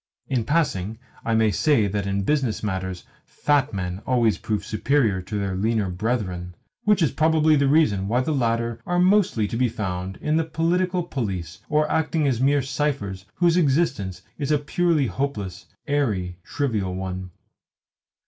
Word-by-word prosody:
In 125 -4 -1
passing, 110 - 0 0.3
I 115 - +1
may 110 -1 +3
say 140 - +3
that 100 0 -2
in 100 0 0
business 130 -3 0
matters 95 -3 -3 0.2
fat 145 -1 +1
men 95 -1 -4
always 120 -4 +2
prove 105 -2 -2
superior 110 -4 +1
to 105 +3 -5
their 100 -2 -2
leaner 105 -1 0
brethren; 90 -3 -2 0.3
which 210 -4 +4
is 145 - +2
probably 155 -1 +3
the 140 -1 +3
reason 120 -11 +3
why 120 +4 +2
the 145 - -1
latter 115 -3 0
are 175 - +1
mostly 180 - +3
to 115 - -5
be 125 +1 +2
found 95 -4 -4
in 155 +1 0
the 165 - +2
Political 175 +3 0
Police, 95 - -4
or 150 0 +2
acting 155 -1 +1
as 125 -3 0
mere 140 +1 +3
ciphers 130 -9 -2
whose 175 -1 +3
existence 135 - +1 0.2
is 145 0 -1
a 150 - +4
purely 155 0 +1
hopeless, 110 -8 -3 0.2
airy, 105 - -1
trivial 105 -10 -2
one. 95 0 -4
115 Hz, 160 wpm, -24 LUFS, 100-150 Hz, 0.3 s, which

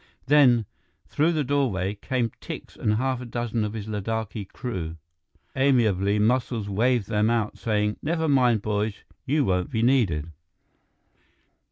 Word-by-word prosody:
Then, 130 -5 +5 0.4
through 160 +4 +1
the 155 -2 0
doorway, 125 -9 0
came 120 +2 -2
Tikse - - -8
and 105 - 0
half 130 +2 -1
a - - -6
dozen 120 -1 -2
of 105 0 -3
his 110 -3 -5
Ladakhi 110 0 -3
crew. 90 -10 -5 0.6
Amiably, 110 -8 +2
Muscles 115 0 +1
waved 115 +3 +1
them 105 0 +1
out, 115 -3 -1
saying, 105 -1 0
"Never 160 +1 -1
mind, 125 -7 +3
boys, 105 0 -2 0.2
you 145 +1 +2
won't 90 -3 0
be 110 - -1
needed." 100 - +2
115 Hz, 140 wpm, -25 LUFS, 105-130 Hz, 0.6 s, Then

